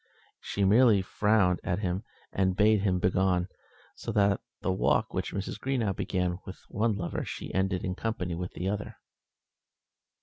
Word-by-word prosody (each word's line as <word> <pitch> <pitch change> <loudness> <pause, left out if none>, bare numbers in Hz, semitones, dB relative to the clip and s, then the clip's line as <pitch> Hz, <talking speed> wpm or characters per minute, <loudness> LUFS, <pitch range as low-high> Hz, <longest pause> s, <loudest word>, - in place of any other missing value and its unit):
She 100 - -1
merely 105 -1 +5
frowned 100 -3 +2
at 90 - 0
him, 95 -1 -2 0.3
and 95 -1 +1
bade 105 0 +4
him 95 -2 +2
begone, 90 0 +1 0.5
so - - -5
that 100 -1 +3 0.2
the 95 - +1
walk 95 - +1
which - - -2
Mrs. 100 +1 -4
Greenow 120 -7 0
began 90 -1 -1
with 95 - -8
one 110 +1 +1
lover 85 -3 -3
she - - -6
ended 95 -1 0
in 90 - -1
company 90 -4 -3
with 90 +2 -4
the 90 - -3
other. 105 +1 -3
95 Hz, 160 wpm, -29 LUFS, 90-105 Hz, 0.5 s, merely